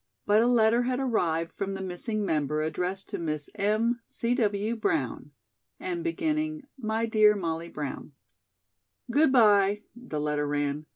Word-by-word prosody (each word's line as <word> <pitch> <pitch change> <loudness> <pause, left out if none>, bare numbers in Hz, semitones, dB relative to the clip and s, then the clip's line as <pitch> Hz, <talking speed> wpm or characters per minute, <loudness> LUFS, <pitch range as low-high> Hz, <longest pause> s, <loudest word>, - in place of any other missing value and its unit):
But 210 +1 +4
a 235 - +3
letter 235 -1 +4
had 250 +1 -1
arrived 170 -11 0
from 195 0 -3
the 195 - -5
missing 205 +4 -3
member 150 -2 0
addressed 180 +5 -3
to - - -4
"Miss 155 -3 -3
M. 225 +4 +1
C. 235 +1 -2
W. 215 -2 0
Brown," 235 +8 -1 0.5
and 345 -2 -3
beginning: 310 -3 -1
"My 225 -2 -1
Dear 215 -2 +5
Molly 165 -3 -3
Brown." 145 -1 -6 1.0
"Good 295 +2 +4
bye," 210 -4 +4
the 240 -11 -5
letter 150 0 -1
ran. 145 +1 -2
210 Hz, 150 wpm, -28 LUFS, 165-240 Hz, 1.0 s, Dear